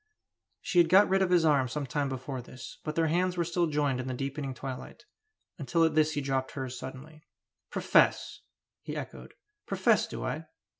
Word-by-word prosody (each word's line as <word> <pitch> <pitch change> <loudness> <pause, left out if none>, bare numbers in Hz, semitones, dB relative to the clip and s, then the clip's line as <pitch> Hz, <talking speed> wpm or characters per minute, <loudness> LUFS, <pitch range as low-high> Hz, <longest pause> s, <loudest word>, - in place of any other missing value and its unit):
She 175 - +1
had 170 -1 +5
got 195 +4 +7
rid 195 0 +2
of 190 - +2
his 175 -2 +4
arm 140 -4 +3
some 145 +4 -3
time 140 +2 -1
before 130 0 -5
this, 125 +1 -11
but 155 0 -4
their 165 - +2
hands 180 +3 +1
were 170 - +2
still 170 +1 0
joined 145 -4 0
in 125 - -4
the 130 - -3
deepening 135 0 -4
twilight, 130 - -8 0.5
until 160 +4 +1
at 160 -1 +3
this 155 0 +3
he 145 - -1
dropped 135 -1 -2
hers 130 -2 -5
suddenly. 135 +5 -9 0.5
"Profess!" - - +2 0.4
he - - -6
echoed. - - -8 0.3
"Profess, - - +2
do - - -5
I? - - -4
145 Hz, 190 wpm, -29 LUFS, 130-165 Hz, 0.5 s, got